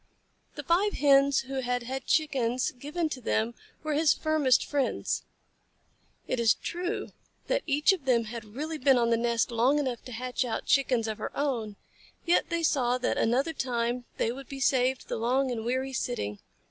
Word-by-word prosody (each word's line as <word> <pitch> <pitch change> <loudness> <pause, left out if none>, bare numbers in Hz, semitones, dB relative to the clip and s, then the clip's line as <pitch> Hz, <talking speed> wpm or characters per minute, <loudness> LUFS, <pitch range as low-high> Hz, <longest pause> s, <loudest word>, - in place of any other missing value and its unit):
The - - -6
five 380 +5 +2
Hens 280 -1 +4
who 270 0 -4
had 245 -1 -1
had 260 +2 -5
Chickens 260 -6 +1
given 300 +6 -3
to 265 -4 -6
them 225 0 0 0.3
were 310 -1 -1
his 305 +1 +4
firmest 310 -5 +2
friends. 285 -3 -1 1.1
It 255 - -1
is 230 -2 +4
true 350 +1 -4 0.4
that - - 0
each 295 +5 +4
of 335 -8 -6
them 240 -3 +3
had 225 +1 -7
really 310 +3 -4
been 265 0 +4
on 235 -1 +2
the - - +5
nest 235 0 0
long 245 +5 +3
enough 260 -5 -2
to 250 - -8
hatch 250 +2 -2
out 235 -3 -3
Chickens 250 -5 +2
of 215 -1 -4
her - - -4
own, 235 -8 -1 0.5
yet 345 +1 +2
they 335 -1 -1
saw 250 -5 +2
that 255 - -1
another 265 +8 +1
time 245 -2 -2
they 225 - +1
would 270 +1 -9
be 275 - -6
saved 260 -1 +1
the - - -3
long 255 +4 +1
and 225 -2 -3
weary 260 +3 -2
sitting. 105 - -3
260 Hz, 185 wpm, -28 LUFS, 240-290 Hz, 1.1 s, the